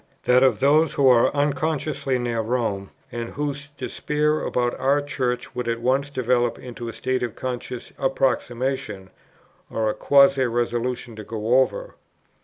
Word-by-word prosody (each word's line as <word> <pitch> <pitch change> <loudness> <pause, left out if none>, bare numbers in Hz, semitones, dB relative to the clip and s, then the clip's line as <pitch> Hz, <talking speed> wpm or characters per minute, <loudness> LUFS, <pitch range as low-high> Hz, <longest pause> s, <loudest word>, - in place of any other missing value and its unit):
that 125 +1 +4
of 130 -1 +4
those 150 +3 +3
who 140 - +4
are 125 -2 +6
unconsciously 145 -1 0
near 120 -2 -2
Rome, 110 -4 -2 0.2
and 120 -1 -4
whose 145 0 -4
despair 150 +1 -1
about 120 -1 0
our 140 +2 +3
Church 130 -4 -3
would 125 -1 -4
at 115 0 -1
once 130 +4 +1
develope 125 -3 +1
into 120 -1 -8
a - - -7
state 130 +3 -1
of 120 -2 -3
conscious 125 -1 -5
approximation, 130 -6 -1 0.6
or 110 -1 0
a - - -4
quasi 140 -2 +4
resolution 120 0 -2
to 110 - -7
go 115 +4 +1
over; 130 - 0
2. - - -22
125 Hz, 155 wpm, -23 LUFS, 120-140 Hz, 0.6 s, are